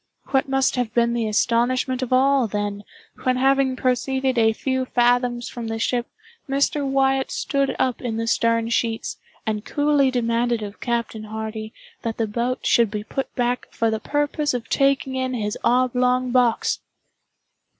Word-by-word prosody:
What 270 Hz, 0 st, +1 dB
must 270 Hz, -1 st, +2 dB
have 245 Hz, -3 st, -1 dB
been 235 Hz, 0 st, +3 dB
the 235 Hz, -2 st, 0 dB
astonishment 245 Hz, +4 st, +1 dB
of 255 Hz, -, -3 dB
all, 265 Hz, -1 st, +4 dB
then, 205 Hz, 0 st, -3 dB, 0.4 s
when 255 Hz, 0 st, +1 dB
having 270 Hz, 0 st, +3 dB
proceeded 260 Hz, +1 st, 0 dB
a 225 Hz, -2 st, +4 dB
few 260 Hz, +3 st, -1 dB
fathoms 245 Hz, -1 st, +1 dB
from 235 Hz, -2 st, -6 dB
the 225 Hz, 0 st, -3 dB
ship, 240 Hz, +1 st, 0 dB, 0.4 s
Mr. 280 Hz, +1 st, +1 dB
Wyatt 270 Hz, -1 st, +1 dB
stood 275 Hz, -1 st, -1 dB
up 255 Hz, -2 st, 0 dB
in 230 Hz, -3 st, -3 dB
the 230 Hz, -, -1 dB
stern 230 Hz, 0 st, +1 dB
sheets, 230 Hz, -1 st, -1 dB, 0.3 s
and 215 Hz, -1 st, -2 dB
coolly 290 Hz, -1 st, +2 dB
demanded 235 Hz, -2 st, 0 dB
of 205 Hz, 0 st, -8 dB
Captain 235 Hz, -2 st, -2 dB
Hardy 220 Hz, 0 st, -5 dB, 0.3 s
that 225 Hz, -1 st, -3 dB
the 225 Hz, -, +1 dB
boat 235 Hz, +4 st, -2 dB
should 235 Hz, -2 st, +4 dB
be 210 Hz, 0 st, -4 dB
put 270 Hz, +5 st, -4 dB
back 245 Hz, 0 st, -1 dB
for 230 Hz, -1 st, 0 dB
the 220 Hz, -, -1 dB
purpose 290 Hz, 0 st, -1 dB
of 230 Hz, -2 st, -4 dB
taking 275 Hz, -1 st, +2 dB
in 260 Hz, -1 st, -1 dB
his 210 Hz, -3 st, -2 dB
oblong 250 Hz, 0 st, +2 dB
box! 245 Hz, -2 st, +2 dB
245 Hz, 160 wpm, -23 LUFS, 230-260 Hz, 0.4 s, all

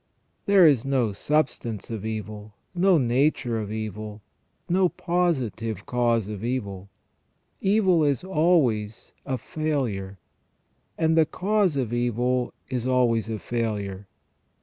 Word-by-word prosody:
There 200 Hz, -3 st, +7 dB
is 135 Hz, -6 st, +4 dB
no 130 Hz, -6 st, 0 dB
substance 120 Hz, -4 st, -1 dB
of 110 Hz, -3 st, -4 dB
evil, 105 Hz, -1 st, -6 dB, 0.2 s
no 180 Hz, 0 st, +4 dB
nature 125 Hz, -2 st, +1 dB
of 105 Hz, -1 st, -5 dB
evil, 110 Hz, -1 st, -6 dB, 0.4 s
no 180 Hz, +1 st, +3 dB
positive 130 Hz, -, -1 dB
cause 120 Hz, -4 st, +1 dB
of 105 Hz, -1 st, -6 dB
evil. 100 Hz, -6 st, -3 dB, 0.7 s
Evil 190 Hz, -5 st, +3 dB
is 140 Hz, -1 st, +1 dB
always 150 Hz, -, +1 dB
a 130 Hz, -, -1 dB
failure, 120 Hz, -10 st, -3 dB, 0.8 s
and 160 Hz, 0 st, +2 dB
the 160 Hz, -2 st, +4 dB
cause 200 Hz, -3 st, +1 dB
of 125 Hz, -4 st, -2 dB
evil 120 Hz, +1 st, 0 dB, 0.2 s
is 125 Hz, -1 st, -3 dB
always 120 Hz, -3 st, +2 dB
a 110 Hz, -, -2 dB
failure. 105 Hz, -4 st, -3 dB
120 Hz, 120 wpm, -25 LUFS, 110-155 Hz, 0.8 s, There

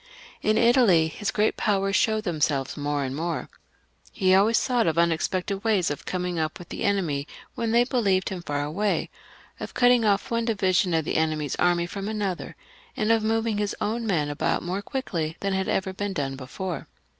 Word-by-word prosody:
In 215 Hz, 0 st, +2 dB
Italy 230 Hz, -10 st, +5 dB
his 205 Hz, +6 st, -3 dB
great 215 Hz, 0 st, +1 dB
powers 195 Hz, -2 st, +1 dB
showed 220 Hz, -1 st, +2 dB
themselves 150 Hz, -7 st, 0 dB
more 145 Hz, -1 st, -1 dB
and 130 Hz, 0 st, -3 dB
more. 165 Hz, +3 st, -3 dB, 0.6 s
He 185 Hz, -3 st, +2 dB
always 205 Hz, +4 st, +5 dB
thought 245 Hz, -6 st, +1 dB
of 165 Hz, 0 st, 0 dB
unexpected 180 Hz, +4 st, 0 dB
ways 210 Hz, -8 st, +2 dB
of 145 Hz, -, -6 dB
coming 180 Hz, -2 st, -2 dB
up 155 Hz, 0 st, -2 dB
with 175 Hz, -, -12 dB
the -, -, -6 dB
enemy 165 Hz, -8 st, 0 dB, 0.3 s
when 230 Hz, -, -2 dB
they 235 Hz, +2 st, +4 dB
thought 245 Hz, -4 st, 0 dB, 0.2 s
him 185 Hz, -2 st, -5 dB
far 145 Hz, -3 st, -2 dB
away; 195 Hz, +8 st, -1 dB, 0.5 s
of -, -, -7 dB
cutting 245 Hz, -1 st, +5 dB
off 205 Hz, 0 st, +1 dB
one 230 Hz, 0 st, 0 dB
division 190 Hz, -5 st, +2 dB
of 160 Hz, -2 st, 0 dB
the -, -, -1 dB
enemjr's 155 Hz, -2 st, 0 dB
army 175 Hz, -1 st, +2 dB
from 195 Hz, +3 st, -5 dB
another; 205 Hz, -4 st, -3 dB, 0.4 s
and 215 Hz, +1 st, +1 dB
of 225 Hz, -1 st, +3 dB
moving 225 Hz, -1 st, 0 dB
his 205 Hz, -1 st, -1 dB
own 225 Hz, +2 st, -2 dB
men 160 Hz, -8 st, +1 dB
about 145 Hz, +1 st, -1 dB
more 185 Hz, +3 st, -2 dB
quickly 170 Hz, -10 st, -3 dB
than 195 Hz, -1 st, -1 dB
had 190 Hz, 0 st, -1 dB
ever 190 Hz, 0 st, -1 dB
been 205 Hz, +1 st, -3 dB
done 135 Hz, -5 st, -2 dB
before. 165 Hz, +7 st, -6 dB
190 Hz, 190 wpm, -25 LUFS, 160-215 Hz, 0.6 s, Italy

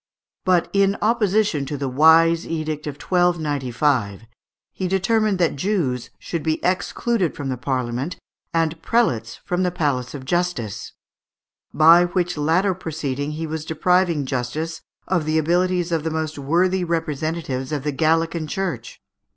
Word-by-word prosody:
But 180 Hz, -2 st, +3 dB
in 200 Hz, 0 st, +3 dB
opposition 210 Hz, -7 st, +2 dB
to 145 Hz, -, -4 dB
the 140 Hz, 0 st, -2 dB
wise 160 Hz, +5 st, +5 dB
edict 155 Hz, -2 st, -3 dB
of 145 Hz, -, -4 dB
1295, 145 Hz, -, 0 dB, 0.5 s
he 185 Hz, -, -3 dB
determined 200 Hz, +2 st, +1 dB
that 170 Hz, -4 st, +1 dB
Jews 140 Hz, -, -1 dB
should 170 Hz, -, -4 dB
be 155 Hz, +1 st, -1 dB
excluded 185 Hz, +1 st, 0 dB
from 135 Hz, -2 st, -3 dB
Parliament, 130 Hz, +4 st, -2 dB, 0.3 s
and 165 Hz, -1 st, 0 dB
prelates 120 Hz, -, +1 dB
from 180 Hz, +1 st, -1 dB
the 180 Hz, -, +2 dB
palace 145 Hz, -7 st, -1 dB
of 130 Hz, -2 st, -8 dB
justice; 175 Hz, -, -2 dB, 0.8 s
by 165 Hz, +3 st, +6 dB
which 175 Hz, 0 st, -1 dB
latter 165 Hz, +6 st, +2 dB
proceeding 150 Hz, -5 st, -4 dB
he 160 Hz, +2 st, -4 dB
was 160 Hz, -1 st, -4 dB
depriving 170 Hz, -1 st, +1 dB
justice 140 Hz, +6 st, -3 dB, 0.3 s
of 175 Hz, -4 st, 0 dB
the 155 Hz, +1 st, +1 dB
abilities 175 Hz, +2 st, +1 dB
of 165 Hz, -2 st, 0 dB
the 160 Hz, -, -1 dB
most 155 Hz, -1 st, -3 dB
worthy 180 Hz, +6 st, +1 dB
representatives 155 Hz, -4 st, -2 dB
of 145 Hz, -3 st, -2 dB
the 150 Hz, -, -1 dB
Gallican 165 Hz, +2 st, +1 dB
Church. 150 Hz, -9 st, -4 dB
160 Hz, 140 wpm, -22 LUFS, 145-180 Hz, 0.8 s, by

